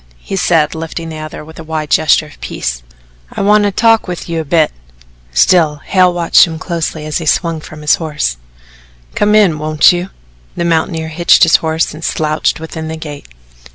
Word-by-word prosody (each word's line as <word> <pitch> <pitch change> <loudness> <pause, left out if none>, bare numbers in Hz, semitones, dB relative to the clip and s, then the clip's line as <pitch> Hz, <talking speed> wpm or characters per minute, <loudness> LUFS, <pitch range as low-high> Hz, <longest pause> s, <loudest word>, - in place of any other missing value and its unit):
he 195 - -6
said, 165 -5 +2
lifting 165 +1 -6
the 155 -1 -7
other 155 0 -8
with 160 +1 -13
a - - -7
wide 155 -1 -4
gesture 155 0 +3
of 150 - -17
peace. - - -4 0.5
"I - - -4
want 210 +1 +4
to 205 - +1
talk 225 +2 +2
with 180 -1 -6
you 165 -1 -2
a - - -2
bit." 155 +1 +2 0.6
Still 150 - +3
Hale 185 -1 +3
watched 175 +1 +4
him 160 -1 -6
closely 160 -2 -4
as 155 +2 -2
he 160 - -6
swung 165 0 0
from 155 0 -11
his 150 -1 +3
horse. 150 - -2 0.8
"Come 210 +1 +2
in 190 -8 +3
won't 155 0 +4
you?" 175 +1 -3 0.5
The 170 - -2
mountaineer 160 -1 -1
hitched 170 +3 +4
his 165 -2 +6
horse 160 0 -1
and 155 +2 -10
slouched 155 0 -1
within 160 0 -7
the 160 0 -5
gate. 150 -3 -9
160 Hz, 190 wpm, -14 LUFS, 155-175 Hz, 0.8 s, his